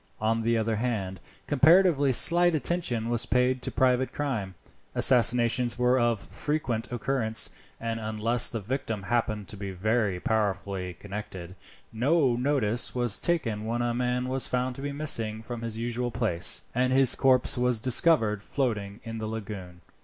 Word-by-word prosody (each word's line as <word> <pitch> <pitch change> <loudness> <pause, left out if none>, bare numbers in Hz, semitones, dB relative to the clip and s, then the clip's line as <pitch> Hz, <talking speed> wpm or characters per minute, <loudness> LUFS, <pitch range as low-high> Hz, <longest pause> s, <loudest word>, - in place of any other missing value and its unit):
On 115 +1 0
the 115 +1 0
other 110 0 -1
hand, 100 -6 -3 0.3
comparatively 155 -1 +4
slight 175 +6 +5
attention 135 -6 -2
was 120 -1 0
paid 125 0 +1
to - - -3
private 130 0 +1
crime. 115 -11 -4 0.4
Assassinations 120 0 +4
were 125 +1 +2
of 120 -2 +1
frequent 130 -6 -4
occurrence, 120 -2 -1 0.3
and 115 0 -4
unless 110 +2 +1
the 115 - -5
victim 110 -1 -4
happened 110 -1 -2
to 105 - -7
be 100 0 -6
very 100 0 -1
powerfully 95 -3 -2
connected, 95 -3 -8 0.4
no 135 +2 +1
notice 125 -3 0
was 120 -4 +1
taken 115 -12 -1
when 120 +2 -2
a 120 0 -1
man 125 +1 -2
was 130 0 0
found 125 0 -2
to 135 - -9
be 145 0 -4
missing 115 -7 0
from 120 0 -7
his 115 -1 -5
usual 120 +1 -3
place, 85 -6 +2
and 125 +1 0
his 130 -1 +6
corpse 130 -2 +3
was 125 -2 0
discovered 115 -4 +2
floating 105 -5 -3
in 115 -1 -7
the 110 - -4
lagoon. 100 -5 -8
120 Hz, 155 wpm, -26 LUFS, 110-130 Hz, 0.4 s, his